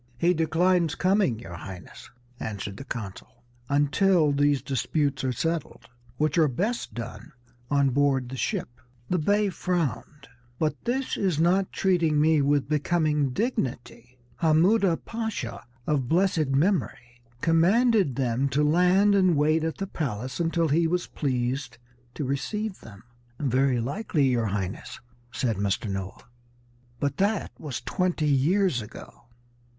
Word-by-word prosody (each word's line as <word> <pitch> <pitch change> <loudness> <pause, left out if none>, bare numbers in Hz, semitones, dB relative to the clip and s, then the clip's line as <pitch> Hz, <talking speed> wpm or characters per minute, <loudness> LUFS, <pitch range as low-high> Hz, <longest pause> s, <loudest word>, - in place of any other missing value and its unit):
"He 170 +7 +3
declines 170 +1 +2
coming, 185 - +2
your 110 -6 -10
Highness," 90 +2 -10 0.3
answered 100 -2 -5
the - - -7
consul, 115 -1 -8 0.3
"until 150 +3 +3
these 145 -1 +2
disputes 140 +1 -1
are 130 - 0
settled, 165 +6 -3 0.3
which 155 +2 +1
are 155 - +5
best 205 - -2
done 115 -2 -7 0.4
on 140 -2 +2
board 135 -1 +2
the 130 - -6
ship." 150 - -3 0.3
The 180 - +2
Bey 205 +5 +2
frowned. 155 - -3 0.3
"But 155 +2 -2
this 260 +2 -1
is 180 -6 0
not 185 +3 +2
treating 170 -5 +2
me 155 0 +4
with 140 0 +1
becoming 150 -1 +1
dignity. 125 - -3 0.2
Hammuda 170 +3 +3
Pasha, 220 - -4 0.2
of 140 -5 0
blessed 170 -3 +2
memory, 135 -5 -1 0.2
commanded 185 - +3
them 130 +1 0
to 140 +3 +1
land 180 +6 +4
and 185 -5 +3
wait 155 +2 +2
at 160 0 -2
the 195 - -3
palace 130 - -4
until 165 -1 +1
he 165 +3 +3
was 175 +1 -1
pleased 125 -2 -2 0.4
to 150 - -3
receive 195 +10 -3
them." 105 0 -13 0.4
"Very 130 -2 +2
likely, 145 - -1
your 120 -3 +1
Highness," 95 -2 -4 0.3
said 115 -5 -1
Mr. 100 +2 -1
Noah, 95 0 -5 0.8
"but 140 +1 -1
that 200 +1 0
was 135 -6 -5
twenty 180 -4 -1
years 150 - +2
ago." 105 +2 -12
150 Hz, 135 wpm, -26 LUFS, 125-180 Hz, 0.8 s, are